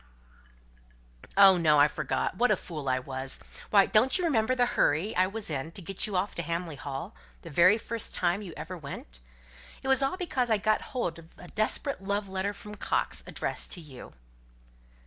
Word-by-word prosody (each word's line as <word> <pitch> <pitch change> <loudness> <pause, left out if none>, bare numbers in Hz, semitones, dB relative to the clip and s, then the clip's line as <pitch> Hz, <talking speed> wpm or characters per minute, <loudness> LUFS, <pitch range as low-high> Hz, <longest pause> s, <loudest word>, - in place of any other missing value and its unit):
"Oh, 195 -2 +8
no; 155 -3 +4
I 145 - +7
forgot. 150 - -2
What 245 +6 +2
a 210 - +4
fool 155 -7 -6
I 130 - +2
was! 130 +1 -4 0.3
Why, 200 -2 +6
don't 240 +8 +4
you 365 - -2
remember 255 -5 +2
the 245 -1 +3
hurry 210 -5 +1
I 185 +1 +3
was 205 -2 -4
in 145 +2 -3
to 195 - -5
get 195 +5 -1
you 205 - -4
off 185 +3 0
to - - -3
Hamley 170 0 -3
Hall, 140 +7 -6 0.3
the 165 - -9
very 180 +7 +6
first 230 0 -1
time 180 +3 +1
you 190 -4 -7
ever 185 +2 -6
went? 140 - -8 0.6
It - - -5
was 265 0 +4
all 270 +7 0
because 265 -10 -1
I 220 - +4
got 215 +1 +1 0.2
hold 170 -9 -2
of 165 0 -15
a 175 - -12
desperate 215 +3 -1
love 200 +1 -2
letter 190 +1 -2
from 210 +1 -10
Coxe, 205 - -1
addressed - - -1
to 180 - -5
you." 145 -6 -12
190 Hz, 195 wpm, -28 LUFS, 160-215 Hz, 0.6 s, Oh